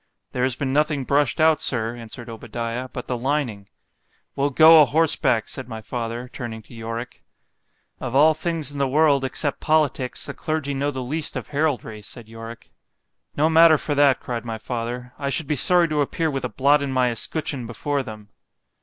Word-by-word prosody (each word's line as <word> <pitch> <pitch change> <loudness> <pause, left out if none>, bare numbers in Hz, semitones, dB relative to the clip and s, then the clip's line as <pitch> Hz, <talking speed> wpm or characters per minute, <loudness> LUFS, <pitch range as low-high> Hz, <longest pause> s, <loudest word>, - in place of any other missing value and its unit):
——There 125 - -3
has 130 -1 +1
been 130 -1 -2
nothing 150 -1 +1
brush'd 140 +3 +1
out, 160 0 +4
Sir, 115 -2 -2
answered 120 0 -10
Obadiah, 115 +2 -5
but 125 - -7
the 125 - -1
lining. 120 -6 -2 0.7
We'll 140 +1 +1
go 160 +3 +8
o'horseback, 150 -6 +2
said 130 - -7
my 110 -1 -6
father, 120 +2 -5
turning 110 -3 -6
to - - -17
Yorick—Of 115 +2 -9
all 155 +3 +6
things 160 -2 -2
in 145 - -7
the 140 - +2
world, 145 0 +3
except 140 +2 -1
politicks, 150 -5 +1
the - - -5
clergy 155 -3 -3
know 140 +1 -1
the 130 -3 -4
least 150 +5 -2
of - - -5
heraldry, 140 -8 -1
said 115 +2 -11
Yorick.—No 115 +6 -7
matter 160 0 +6
for 145 - -2
that, 145 -2 +4
cried 120 -2 -5
my 115 -2 -5
father——I 125 +4 -5
should 155 +3 -1
be 150 - -1
sorry 175 +5 +5
to 150 -1 +1
appear 160 +3 -1
with 135 -2 -3
a - - -3
blot 140 +6 +3
in 140 -1 -2
my 130 -2 +2
escutcheon 135 +1 -3
before 140 +4 -2
them. 110 -4 -10
130 Hz, 180 wpm, -23 LUFS, 120-150 Hz, 0.7 s, go